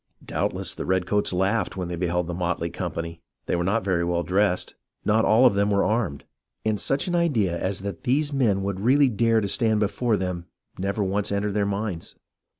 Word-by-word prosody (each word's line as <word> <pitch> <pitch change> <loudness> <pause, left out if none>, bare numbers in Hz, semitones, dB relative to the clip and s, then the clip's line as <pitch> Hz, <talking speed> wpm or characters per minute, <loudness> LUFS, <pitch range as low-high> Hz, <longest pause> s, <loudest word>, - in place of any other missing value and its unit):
Doubtless - - -1
the - - -5
redcoats 95 +2 +1
laughed 95 +2 0
when 90 -2 -3
they 85 - -4
beheld 90 0 -1
the 85 - -4
motley 85 -1 -2
company. 85 0 -5 0.2
They - - 0
were 85 - 0
not 105 +4 +1
very 90 -3 +1
well 85 0 0
dressed, 95 0 +1 0.3
not 110 +2 +3
all 115 +4 +5
of 125 - +6
them 100 +1 +1
were 100 -1 +2
armed, 105 - -1 0.4
and 110 -1 +1
such 135 - +1
an 175 - -2
idea 130 - +1
as 95 +2 -2
that 100 -2 -5
these 145 +4 +1
men 110 -8 +2
would 100 -1 -2
really 135 +6 +4
dare 115 0 +2
to 100 - -1
stand 110 0 +2
before 105 +2 +1
them 90 -2 -4 0.3
never 100 +2 -1
once 100 +1 -1
entered 100 0 -1
their 100 -1 +1
minds. 100 -4 -4
100 Hz, 200 wpm, -25 LUFS, 90-110 Hz, 0.4 s, of